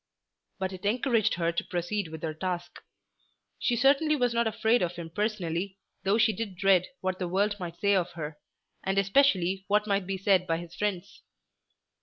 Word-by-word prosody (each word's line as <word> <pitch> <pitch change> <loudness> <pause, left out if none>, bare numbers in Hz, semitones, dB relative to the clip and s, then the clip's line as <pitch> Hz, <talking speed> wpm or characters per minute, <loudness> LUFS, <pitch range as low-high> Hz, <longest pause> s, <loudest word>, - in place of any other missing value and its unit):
But 190 -1 -3
it 185 - -9
encouraged 230 +1 +2
her 170 -1 0
to 170 - -2
proceed 180 +2 -2
with 160 0 -9
her 160 -1 -2
task. 175 +1 -4 0.8
She 245 - +1
certainly 280 +5 +4
was 245 -4 +1
not 235 0 +2
afraid 220 +2 +2
of 175 0 -1
him 170 -2 -7
personally, 190 -2 -2 0.2
though 195 +2 +2
she 220 -1 +4
did 200 -2 -5
dread 190 -2 +4
what 185 0 -2
the 180 - -1
world 205 +3 +1
might 175 -2 -6
say 200 0 +3
of 180 -2 0
her, 150 -2 -6 0.4
and 195 +1 -1
especially 195 -3 +3
what 210 +1 +2
might 200 -3 0
be 195 0 -2
said 190 -1 +2
by 165 - +1
his 170 0 -9
friends. 200 +1 -3
190 Hz, 185 wpm, -28 LUFS, 175-210 Hz, 0.8 s, certainly